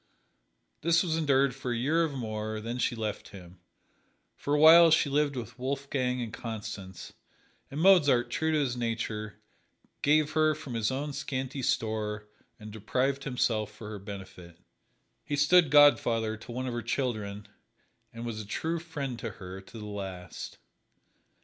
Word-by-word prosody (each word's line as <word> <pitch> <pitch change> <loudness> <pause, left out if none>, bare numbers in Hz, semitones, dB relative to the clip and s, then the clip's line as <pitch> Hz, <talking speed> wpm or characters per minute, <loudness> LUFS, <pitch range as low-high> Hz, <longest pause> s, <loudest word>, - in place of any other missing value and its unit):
This 170 +2 +3
was 165 -3 -1
endured 140 -4 +2
for 130 -1 -5
a 120 - -1
year 155 +7 +2
or - - -2
more, 110 -5 -4
then 115 +3 -5
she 120 - 0
left 110 -2 -4
him. 90 -2 -13 0.8
For 145 - -1
a - - +2
while 165 +2 +9
she 155 -3 +3
lived 145 0 +1
with 120 -1 -7
Wolfgang 130 -1 -2
and 115 -2 -7
Constance, 105 -6 -7 0.6
and 140 - -5
Mozart, 150 -9 +5
true 160 0 0
to 155 - +2
his 135 -5 0
nature, 110 -3 -3 0.7
gave 150 +1 +3
her 155 -1 +3
from 140 -4 -8
his 115 -2 0
own 140 +2 -3
scanty 135 0 -4
store 110 -4 -1 0.3
and 105 0 -9
deprived 130 +6 -1
himself 115 -5 0
for 105 0 -10
her 105 - -6
benefit. 95 -4 -10 0.7
He 145 - -2
stood 155 +3 +5
godfather 120 -6 +5
to 115 +2 -11
one 130 +2 -3
of 125 - -3
her 120 - -2
children 110 -4 -3 0.6
and 115 +1 -7
was 110 -2 -4
a - - -9
true 165 +9 -2
friend 140 -7 -5
to 115 - -4
her 95 +1 -9
to 105 +4 -13
the 105 - -7
last. 95 -4 -7
120 Hz, 160 wpm, -29 LUFS, 110-145 Hz, 0.8 s, while